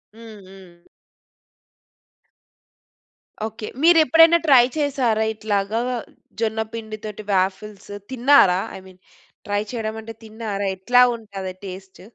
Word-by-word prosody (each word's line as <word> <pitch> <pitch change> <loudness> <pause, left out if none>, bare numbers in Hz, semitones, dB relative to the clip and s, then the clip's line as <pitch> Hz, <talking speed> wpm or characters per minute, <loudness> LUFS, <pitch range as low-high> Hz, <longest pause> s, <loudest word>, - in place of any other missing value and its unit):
హ్మ్, 225 -2 -12
హ్మ్. 185 -3 -16 2.7
ఓకే. 220 -1 -8 0.2
మీరు 340 0 +6
ఎప్పుడైనా 330 +4 +6
ట్రై 255 -4 +7
చేసారా? 260 -7 0
ఇట్లాగా 210 0 -2 0.6
జొన్నపిండి 220 0 -3
తోటి 210 0 -7
వాఫిల్స్ 195 +2 -2 0.2
తిన్నారా? 245 -8 +4 0.2
ఐ - - -9
మీన్ 185 -1 -17 0.5
ట్రై 205 0 0
చేయడం 220 -2 -4
అంటే 225 +1 -9
తిన్నారా? 215 -2 -5
ఎట్లా 245 +6 +3
ఉంటది 195 -4 -7
టేస్ట్? 190 0 -10
215 Hz, 105 wpm, -21 LUFS, 195-230 Hz, 2.7 s, ట్రై